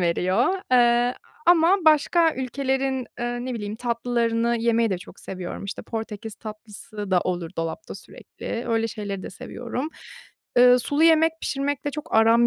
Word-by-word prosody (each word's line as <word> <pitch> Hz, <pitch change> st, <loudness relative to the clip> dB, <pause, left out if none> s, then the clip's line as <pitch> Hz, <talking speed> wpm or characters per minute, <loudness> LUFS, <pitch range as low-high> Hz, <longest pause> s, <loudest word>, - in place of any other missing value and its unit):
veriyor. 185 Hz, -, +1 dB
Eee, 240 Hz, -1 st, +5 dB, 0.4 s
a -, -, +8 dB
ama 350 Hz, +3 st, +5 dB
başka 315 Hz, +2 st, +4 dB
ülkelerin, 265 Hz, 0 st, -1 dB
ııı, 240 Hz, 0 st, -2 dB
ne 255 Hz, -1 st, -3 dB
bileyim, 210 Hz, -1 st, -5 dB
tatlılarını 235 Hz, -1 st, 0 dB
yemeyi 230 Hz, -1 st, +2 dB
de 185 Hz, -, -1 dB
çok 185 Hz, -, -13 dB
seviyorum. 185 Hz, +1 st, -6 dB
İşte, 200 Hz, -, -6 dB
Portekiz 225 Hz, -1 st, -6 dB
tatlısı 215 Hz, -2 st, -8 dB
da 180 Hz, -1 st, +4 dB
olur 175 Hz, -2 st, -3 dB
dolapta 165 Hz, -, -4 dB
sürekli, 235 Hz, -, -7 dB
öyle 225 Hz, 0 st, +1 dB
şeyleri 200 Hz, -3 st, -5 dB
de -, -, -7 dB
seviyorum. 245 Hz, +9 st, -5 dB, 0.7 s
Iıı, 250 Hz, 0 st, +7 dB
sulu 290 Hz, +5 st, 0 dB
yemek 325 Hz, 0 st, +5 dB
pişirmekle 285 Hz, +1 st, -2 dB
çok 300 Hz, +2 st, -6 dB
aram 230 Hz, +2 st, +5 dB
235 Hz, 150 wpm, -24 LUFS, 215-265 Hz, 0.7 s, a